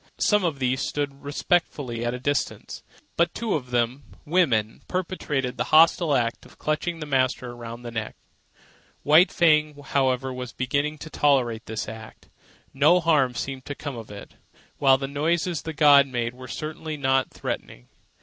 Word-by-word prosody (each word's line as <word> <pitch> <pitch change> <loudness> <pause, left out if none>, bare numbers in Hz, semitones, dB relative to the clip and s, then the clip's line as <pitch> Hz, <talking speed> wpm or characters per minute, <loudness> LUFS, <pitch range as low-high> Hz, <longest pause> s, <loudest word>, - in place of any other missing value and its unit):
Some 210 -2 +2
of 165 -5 -1
these 130 0 0
stood 140 -1 -3
respectfully 145 -5 -1
at 120 +1 -1
a - - -6
distance; 145 +3 -2 0.3
but 170 - +1
two 230 -2 -2
of 130 -5 -3
them, 120 +2 0 0.2
women, 130 -11 +1
perpetrated 150 -8 -2
the 125 - -1
hostile 160 -1 +5
act 115 -2 -1
of - - -18
clutching 155 +3 -2
the 155 - -5
master 130 -3 0
around 120 0 -9
the 120 - -6
neck. 110 -2 -4 0.9
White 160 +6 +6
Fang, 155 -3 +3
however, 130 -2 0
was 125 -1 -6
beginning 140 +4 -1
to 160 +1 -10
tolerate 125 -6 +1
this 110 -1 -4
act. 110 0 -11 0.4
No 180 - +5
harm 150 -7 +2
seemed 135 +1 -5
to 145 - -5
come 145 -2 -6
of 115 -2 -9
it, 100 0 -10 0.5
while 135 -1 +5
the 135 0 -4
noises 165 +4 -1
the 160 - -5
gods 145 -2 +6
made 120 -2 -2
were 130 0 -11
certainly 155 +3 -5
not 135 -1 +1
threatening. - - -6
135 Hz, 165 wpm, -25 LUFS, 125-155 Hz, 0.9 s, White